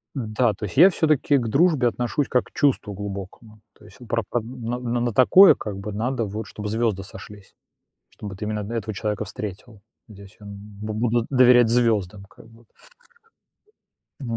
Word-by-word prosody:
Да, 115 -2 0
то 105 - -12
есть 100 - -9
я 180 +6 +8
всё-таки 155 -5 +1
к 120 - -2
дружбе 145 -3 +3
отношусь 125 +4 -2
как 125 - +1
к - - -20
чувству 130 -7 0
глубокому. 100 +2 -8 0.2
То - - -21
есть, 105 -2 -17
а 125 - -12
про 115 0 -1
одн 120 +1 -3 0.2
н 125 - -5
на 120 0 -1
на 120 -1 0
такое 185 - +7
как 105 -3 -7
бы 100 +2 -6
надо 115 +4 -2
вот, 105 +1 -6
чтоб 105 - -9
звёзды 110 -3 -1
сошлись. 100 +1 -13 0.6
Чтобы 100 -2 -9
ты 105 - -5
именно 105 0 -3
на 110 +4 -7
этого 110 -1 -4
человека 105 +1 -3
встретил. 105 +2 -8 0.3
Здесь 100 -2 -15
он 100 -1 -10 0.3
бу 110 0 -4
буду 115 +1 0
доверять 125 -3 +5
звёздам, 110 -5 0
как - - -18
бы 115 +1 -20 1.6
во 115 -4 -4
110 Hz, 185 wpm, -23 LUFS, 105-120 Hz, 1.6 s, я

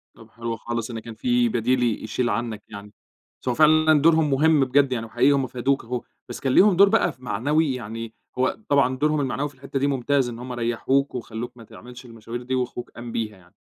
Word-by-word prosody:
طَب 115 - -16
حلو 115 0 -5
خالص 115 +1 -4
إن 115 - -5
كان 115 +1 -9
في 120 +1 +1
بديل 125 +2 +1
ي 115 -3 0
يشيل 120 +3 -1
عنّك 110 -1 -3
يعني، 100 0 -10 0.5
بس - - -3
هو 125 - +1
فعلًا 155 0 +5
دورهم 160 -1 +4
مهم 150 +1 +4
بجد 135 +1 +3
يعني 115 -3 -2
وحقيقي 115 +5 +2
هُم 135 -2 +1
فادوك 130 +3 -1
أهو، 125 0 -3 0.3
بس - - -6
كان 130 -2 0
ليهم 200 -1 +6
دور 200 +2 +6
بقى 225 - +2
ف - - -22
معنوي 135 +6 0
يعني، 115 -1 -6 0.2
هو 130 0 +1
طبعًا 135 -2 +3
دورهم 150 +2 +1
المعنوي 135 +2 -2
في 140 - -21
الحتّة 135 +1 -4
دي 140 - +1
ممتاز 135 -1 +1
إن 115 -1 -8
هُم 125 +1 -7
ريّحوك، 120 +4 0
وخلّوك 120 0 -6
ما 115 - -12
تعملش 125 +3 -13
المشاوير 115 0 -8
دي 130 +1 -2
وأخوك 125 -1 -3
قام 120 0 -8
بيها 110 -3 -3
يعني، 90 -1 -23
125 Hz, 220 wpm, -24 LUFS, 115-140 Hz, 0.5 s, ليهم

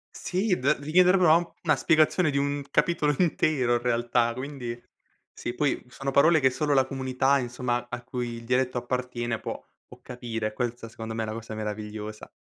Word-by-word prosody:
Sì 185 +1 0
d 140 +4 +2
devi 145 +2 -7
chiedere 180 +2 +6
proprio 170 -3 +6
a - - +2
un 170 -1 -7
una 155 -3 +3
spiegazione 155 +3 +3
di 140 - -1
un 140 0 0
capitolo 150 -4 +2
intero 155 -8 +2
in 120 - +1
realtà, 120 -1 +1
quindi 125 -2 -6 0.5
sì, 120 - -5
poi 145 +2 0
sono 135 +2 -4
parole 160 +4 +5
che 130 -2 +4
solo 145 +2 0
la 135 -1 +4
comunità, 135 +1 +1
insomma, 120 -1 -2
a 120 0 -6
cui 120 -2 -4
il 115 - -9
dialetto 125 0 +1
appartiene 120 -2 -2
può - - -6 0.2
può - - -15
capire, 115 -3 -4
questa 120 -1 -4
secondo 110 -1 -7
me 110 0 -2
è - - -2
la - - -3
cosa 115 0 -7
meravigliosa. 105 0 -6
125 Hz, 195 wpm, -27 LUFS, 120-145 Hz, 0.5 s, chiedere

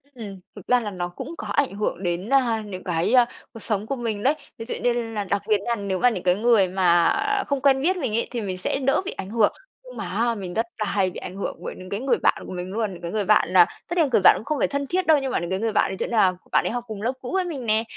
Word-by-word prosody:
Ừm, 200 -5 -8 0.2
thực 205 - -12
ra 250 0 +4
là 210 -3 -4
nó 175 -1 -4
cũng 260 - -8
có - - -6
ảnh 280 -8 +1
hưởng 205 -2 -2
đến, 175 +4 -2
à, 240 -5 +3
những 185 -3 -7
cái, 175 +6 0
à, 245 -2 +7 0.3
cuộc 225 - -9
sống 210 -2 -1
của 275 - -1
mình 225 -4 -3
đấy. 275 - +4 0.2
Ví 225 - -6
dụ 245 - -4
như 245 - +3
là 225 -3 -3
đặc 200 +1 -1
biệt 215 -1 +4
nha 235 -1 +1
nếu 200 -3 -3
mà 250 - +5
những 185 -7 -4
cái 180 0 +3
người 220 -3 +4
mà, 175 -2 +3
à, 410 0 +1
không 280 -2 -1
quen 270 -1 +4
biết 365 +5 +2
mình 255 -10 -2
ấy 230 - 0
thì 240 -2 -3
mình 185 -3 -4
sẽ 185 - -1
đỡ 275 +6 +1
bị 390 - -3
ảnh 190 - -7
hưởng. 220 -2 +2 0.3
Nhưng - - -12
mà - - -4
á 235 0 0
mình 185 -3 -6
rất 225 - 0
là 215 - -1
hay 195 -1 +1
bị - - -9
ảnh 185 - -8
hưởng 200 - -4
bởi - - -5
những 185 0 -10
cái 200 - -3
người 265 +2 +1
bạn - - +1
của - - -7
mình 180 +1 -5
luôn, 215 -1 -2
những 175 - -11
cái 170 - -5
người 210 -1 -1
bạn 210 -4 +4
là 180 -1 +7 0.2
tất 345 - -4
nhiên 330 - +5
là 275 - -3
người 220 - +4
bạn - - +9
cũng 220 - -9
không 305 -2 -1
phải - - +3
thân 280 0 -3
thiết 365 +4 -1
đâu 315 -2 +6
nhưng 265 -1 -2
mà - - +1
những 175 - -4
cái 190 +1 -1
người 225 0 0
bạn 210 - +2
ấy 190 - -5
sẽ - - -1
là 205 -5 +3 0.2
bạn - - +3
ấy - - 0
học 245 0 -3
cùng 210 -2 -6
lớp 245 +4 0
cũ 250 - -6
với 380 -1 +1
mình 280 -8 -5
nè. 220 0 +2
220 Hz, 325 wpm, -24 LUFS, 190-255 Hz, 0.3 s, bạn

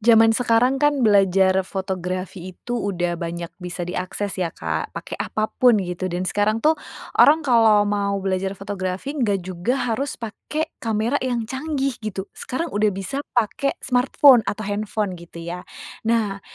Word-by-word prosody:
Zaman 225 0 +6
sekarang 245 +3 +2
kan 290 -3 +3
belajar 195 -2 +4
fotografi 185 -1 -4
itu 240 - -7
udah 180 -7 -1
banyak 170 0 -5
bisa 180 0 -4
diakses 185 +3 -3
ya, 175 - +1
Kak, 80 - -4
pake - - -7
apapun 220 +2 +2
gitu. 180 +1 -3
Dan 180 +1 -2
sekarang 210 +4 0
tuh, 310 - +6 0.5
orang 310 +2 +6
kalau 225 -5 +5
mau 200 -1 0
belajar 190 0 -1
fotografi 195 +5 -4
nggak 205 - 0
juga 185 +7 -1 0.2
harus 270 +4 -2
pake 300 +8 -4
kamera 225 +4 0
yang 245 -3 -1
canggih 270 +1 -2
gitu. 200 -3 -4
Sekarang 330 +7 -4
udah 210 +1 +2
bisa 195 +7 -3 0.2
pake 245 +4 +1
smartphone 255 0 +5
atau 205 +2 -3
handphone 205 0 -2
gitu 170 0 -14
ya. 175 +1 -6 0.4
Nah, 215 -4 +1
205 Hz, 150 wpm, -22 LUFS, 185-240 Hz, 0.5 s, Zaman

